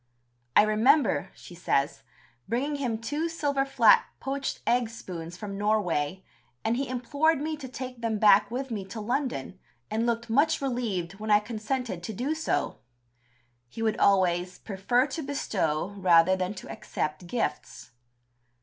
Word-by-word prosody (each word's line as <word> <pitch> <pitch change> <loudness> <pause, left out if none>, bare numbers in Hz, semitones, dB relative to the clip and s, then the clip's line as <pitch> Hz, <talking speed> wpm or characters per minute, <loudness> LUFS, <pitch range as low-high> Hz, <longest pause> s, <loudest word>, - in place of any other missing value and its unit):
"I - - +8
remember," 215 - +3
she - - -13
says, 145 -6 0 0.5
"bringing 280 +6 -1
him 245 -5 -1
two 295 +9 -2
silver 285 -4 0
flat 275 - +5 0.2
poached 275 0 -3
egg 240 -1 +2
spoons 175 -6 -8
from 200 -1 -6
Norway, 190 -5 0 0.4
and 225 - +2
he 270 +1 -2
implored 285 +5 +1
me 310 +2 -2
to 275 -3 -7
take 255 -1 -7
them 225 -2 0
back 205 -1 +6
with 260 +2 -4
me 210 -3 -3
to 200 +4 -7
London, 245 - -2 0.3
and 225 +2 0
looked 235 0 -1
much 285 +8 +3
relieved 215 -9 -2
when 215 +1 -5
I 210 0 +6
consented 220 -1 -3
to 220 +6 -5
do 260 +9 -1
so!" 315 - -1 0.9
He 225 - -5
would 220 -1 0
always 180 -2 +3
"prefer 220 +5 +1
to 320 +3 -5
bestow 200 - -1
rather 185 -1 +5
than 185 +2 -2
to - - -8
accept 155 +3 -4
gifts." 160 - -3
220 Hz, 150 wpm, -27 LUFS, 190-265 Hz, 0.9 s, I